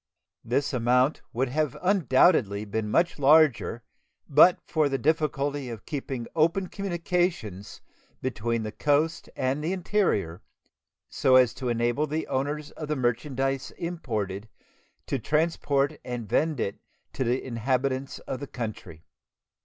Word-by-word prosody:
This 135 +5 0
amount 125 +3 +2
would 125 +2 -1
undoubtedly 150 - +2
have 105 -1 -9
been 110 0 -1
much 170 +7 +1
larger 140 -5 +4 0.4
but 155 +5 +6
for 155 -3 +1
the 135 - 0
difficulty 145 -3 0
of 115 -4 -8
keeping 135 -5 -4
open 170 +4 +2
communications 175 - -2 0.4
between 115 -2 -2
the 110 - -4
coast 145 +8 0
and 135 +3 -1
the 165 - -1
interior, 175 - 0 0.7
so 130 - +3
as 125 -3 +5
to 130 -2 -4
enable 120 +5 0
the 155 +2 -2
owners 145 +3 -2
of 155 - -7
the 150 - -1
merchandise 135 +2 -1
imported 110 - -4 0.6
to 135 - -2
transport 150 0 0
and 120 -3 -5
vend 155 +5 +1
it 100 - -2 0.3
to - - -1
the 125 +1 +1
inhabitants 130 +2 -1
of 130 - -6
the 140 - -6
country. 105 -10 -7
135 Hz, 130 wpm, -27 LUFS, 120-155 Hz, 0.7 s, but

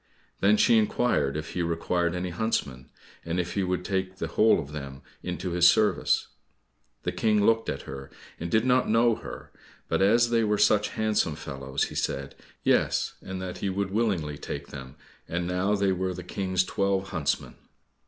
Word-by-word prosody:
Then 105 +2 +4
she 115 +1 +5
inquired 105 - +1
if 75 - -5
he 90 - -2
required 85 +1 0
any 90 0 -3
huntsmen, 70 - -2 0.3
and 85 +2 -2
if 90 0 -2
he 100 - 0
would 90 -1 -1
take 95 -1 -2
the - - -4
whole 110 +1 +4
of 70 - -6
them 70 -2 -7 0.2
into 90 0 -4
his 90 0 +6
service. 105 +2 +2 0.7
The - - -1
King 105 -2 +2
looked 115 0 +2
at - - -4
her 65 0 -8 0.3
and 85 - -4
did 110 +6 +2
not 130 0 +3
know 115 +1 +4
her, - - -9 0.4
but - - 0
as 115 +4 +4
they 115 -1 +3
were 105 -1 +1
such 105 0 +4
handsome 105 -7 +1
fellows, 70 -2 -3
he - - -9
said, 70 0 -2 0.3
"Yes," - - +2
and 95 0 -6
that 90 -1 -6
he 100 - -1
would 95 0 -2
willingly 95 -10 -1
take 70 0 -6
them, 65 -2 -9 0.3
and 85 +1 -2
now 90 +3 +1
they 100 -1 +2
were 95 0 -1
the 90 - -7
King's 95 0 0
twelve 95 +1 -1
huntsmen. 80 -7 -2
95 Hz, 185 wpm, -27 LUFS, 85-105 Hz, 0.7 s, his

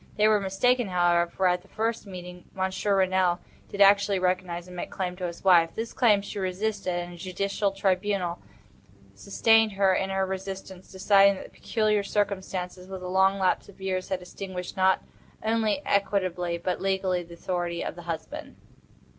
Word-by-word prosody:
They 210 0 +4
were 215 -1 +4
mistaken, 240 +5 +1
however, 175 -2 +2
for, 190 +2 -2
at 180 0 +2
the 195 - -21
first 225 0 -2
meeting, 180 -1 -9
Monsieur 190 +1 0
Renelle 185 -2 +2 0.3
did 200 - -4
actually 200 0 +5
recognize 180 -1 -1
and 180 0 -11
make 175 - -5
claim 180 -2 -3
to 180 -1 -3
his 170 - -9
wife. 170 -3 +5
This 230 +1 -4
claim 210 -5 +3
she 200 - -6
resisted, 195 +1 -2
and 175 0 -4
a - - -11
judicial 195 +3 -1
tribunal 195 -2 0 0.7
sustained 225 -2 +3
her 195 -1 +3
in 190 +1 0
her 195 0 0
resistance, 190 -1 -7
deciding 195 +1 +5
that - - -8
the - - -12
peculiar 215 -2 0
circumstances, 190 -3 -3
with 190 -1 -7
the 180 - -5
long 190 +1 +3
lapse 190 0 0
of 195 - -16
years, 185 -1 -3
had 185 -1 -2
extinguished, 180 0 -7
not 190 0 +3 0.4
only 225 +4 +1
equitably, 185 -4 0
but 180 +1 -3
legally, 190 -2 0
the 170 0 -11
authority 175 -1 -3
of - - -3
the 175 - -9
husband. 165 -2 -6
190 Hz, 175 wpm, -27 LUFS, 180-200 Hz, 0.7 s, actually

